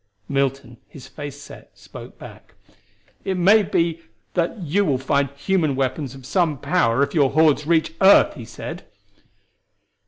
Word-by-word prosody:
Milton, 135 -3 -2
his 135 - -13
face 145 -1 -9
set, 145 - -14
spoke - - -12
back: - - -14 0.7
"It 190 -1 -2
may 200 +5 +5
be 165 -4 -1 0.3
that 175 +5 -1
you 185 +2 0
will 140 -9 +1
find 140 +1 0
human 155 -2 0
weapons 135 0 -3
of 135 -2 -13
some 160 -1 0
power 135 -5 +1
if - - -3
your 145 -5 +3
hordes 155 -1 +2
reach 165 -1 +1
earth," 195 +1 +6
he - - -10
said. - - -8
150 Hz, 150 wpm, -21 LUFS, 135-175 Hz, 0.7 s, earth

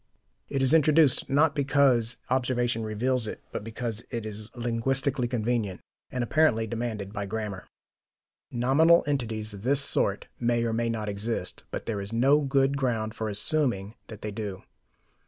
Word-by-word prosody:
It 135 -1 0
is 135 +3 +4
introduced, 155 -3 +4
not 145 +2 +3
because 135 -5 +2
observation 120 -3 0
reveals 115 +2 0
it, - - -7
but - - -4
because 115 0 -4
it 115 -3 -4
is 105 0 -6
linguistically 125 +2 +1
convenient 115 -5 -1 0.3
and 125 -1 -2
apparently 120 -4 +2
demanded 110 -3 -4
by 100 -1 -4
grammar. 105 -3 -5 0.8
Nominal 140 +8 +4
entities 115 -7 -2
of 100 - -9
this 135 +5 +3
sort 100 -7 0
may 120 -1 +1
or 115 -1 -1
may 115 +1 0
not 110 -2 -3
exist, 105 +3 -4
but - - -5
there 105 -3 -2
is 100 +2 -5
no 135 +6 +4
good 135 0 +1
ground 115 -5 -1
for 110 -1 -3
assuming 105 -1 +1
that 110 -2 -10
they 105 - -3
do. 100 -2 -6
120 Hz, 155 wpm, -27 LUFS, 110-135 Hz, 0.8 s, is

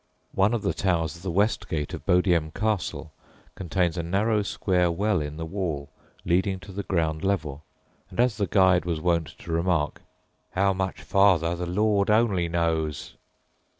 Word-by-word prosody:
One 100 +5 +3
of 115 - -3
the - - 0
towers 85 -5 0
of 85 - -13
the 95 - -4
west 100 +1 0
gate 75 -2 -3
of - - -8
Bodiam 90 -3 +3
Castle 105 -7 -2 0.4
contains 90 -1 -1
a - - +1
narrow 105 +6 +1
square 90 -3 +1
well 95 +1 0
in 75 0 -5
the 80 - -4
wall 80 -6 -4 0.3
leading 95 +2 +1
to 85 - -11
the 100 +2 -4
ground 80 -5 -1
level, 80 -7 -1 0.5
and, - - -10
as 120 -3 +3
the 100 -3 0
guide 95 -3 +4
was 85 -2 -2
wont 85 -1 +1
to - - -8
remark, 85 -2 0 0.5
"how 95 +1 +2
much 95 0 -3
farther 90 -4 +3
the 90 0 -4
Lord 100 +2 +1
only 105 -6 +2
knows"! 80 -3 -1
90 Hz, 170 wpm, -26 LUFS, 80-100 Hz, 0.5 s, guide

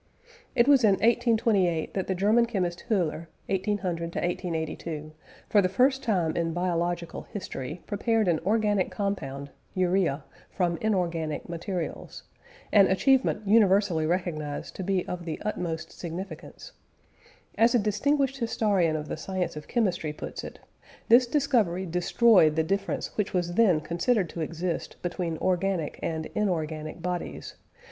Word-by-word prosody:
It 235 - +4
was 275 -3 +6
in 210 -3 +6
1828 220 -6 +2
that 190 - -2
the 190 - 0
German 215 +5 +3
chemist 180 -6 -2
Whöler 170 -6 0 0.2
(1800 185 -4 -2
1882) 160 -3 -3 0.4
for 205 - +4
the 185 - +1
first 260 +7 +3
time 180 -8 0
in 165 -1 -1
biological 175 -1 -2
history 165 -5 -6
prepared 220 +1 0
an 165 -3 +2
organic 205 -1 +1
compound 140 -9 -4 0.2
(urea) 180 -6 +1 0.3
from 175 -2 0
inorganic 170 -7 -1
materials 170 +1 -5 0.5
an 200 -2 +6
achievement 250 +1 +2
universally 195 -6 +4
recognised 155 -4 -3
to 190 - -3
be 190 -1 0
of 180 -1 -4
the 160 -2 -4
utmost 170 -6 -3
significance. 175 - -8 0.8
As 230 +2 +4
a - - +7
distinguished 270 +6 +1
historian 205 -8 +1
of 150 -1 -4
the - - -4
science 185 +1 -3
of 150 -1 -8
chemistry 185 -10 0
puts - - -7
it: - - -8 0.5
"This 245 +2 +7
discovery 235 - +1
destroyed 180 -1 +4
the 160 - +2
difference 195 +4 -2
which 210 -2 -1
was 175 -1 0
then 185 -7 +4
considered 175 +4 0
to 170 - -6
exist 170 +2 -3
between 175 -2 -2
organic 185 -3 -1
and 160 -1 -2
inorganic 160 -4 -2
bodies, 180 -1 -4
viz. - - -30
180 Hz, 140 wpm, -27 LUFS, 165-210 Hz, 0.8 s, a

